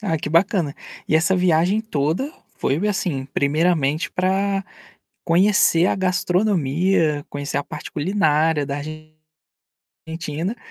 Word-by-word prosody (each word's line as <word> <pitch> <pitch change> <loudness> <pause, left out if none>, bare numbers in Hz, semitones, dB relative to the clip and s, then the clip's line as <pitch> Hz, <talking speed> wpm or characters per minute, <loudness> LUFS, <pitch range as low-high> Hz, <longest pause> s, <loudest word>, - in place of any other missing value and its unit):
Ah, 180 -7 -1
que 150 - -4
bacana. 170 -3 +2 0.3
E - - +1
essa 185 +4 +2
viagem 180 +3 +2
toda, 180 - -2 0.2
foi 135 - 0
assim 180 -10 -2
primeiramente 150 +2 +1
para 195 +1 0 0.6
conhecer 180 -1 +4
a - - +1
gastronomia, 180 -4 +1
conhecer 145 0 -4
a 145 - -2
parte - - -8
culinária 155 -3 +1
da 140 0 -3 1.1
Argentina, 165 +5 -5
170 Hz, 110 wpm, -21 LUFS, 150-190 Hz, 1.1 s, conhecer